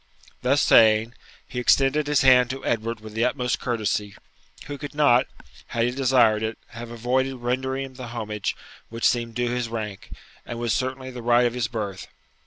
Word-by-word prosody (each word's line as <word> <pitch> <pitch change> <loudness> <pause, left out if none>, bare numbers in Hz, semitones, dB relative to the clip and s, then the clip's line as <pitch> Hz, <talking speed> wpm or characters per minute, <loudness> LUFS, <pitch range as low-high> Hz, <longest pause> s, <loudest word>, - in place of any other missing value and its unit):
Thus 140 +3 +2
saying, 110 +1 +5 0.3
he 125 - -5
extended 135 +4 +3
his 145 -2 +2
hand 125 -2 +6
to 135 +1 -6
Edward 115 0 -2
with 110 -1 -10
the 115 +2 0
utmost 125 -1 0
courtesy, 105 -4 -2 0.5
who 145 -1 -7
could 145 0 -7
not, 135 -5 +4 0.4
had 115 0 0
he 120 - 0
desired 125 -5 +3
it, 110 0 -3
have 115 +1 -9
avoided 125 +3 -1
rendering 130 +2 -2
him 135 - -12
the 125 -1 -8
homage 110 -3 -4 0.3
which 115 0 +1
seemed 115 -2 -1
due 120 0 0
to - - -2
his 125 -2 -2
rank, 105 -4 -6 0.3
and 120 - -7
was 120 -2 -1
certainly 130 0 -3
the 125 -1 -8
right 120 +1 +3
of 120 - 0
his 125 -2 -1
birth. 105 -5 -5
120 Hz, 190 wpm, -24 LUFS, 115-130 Hz, 0.5 s, hand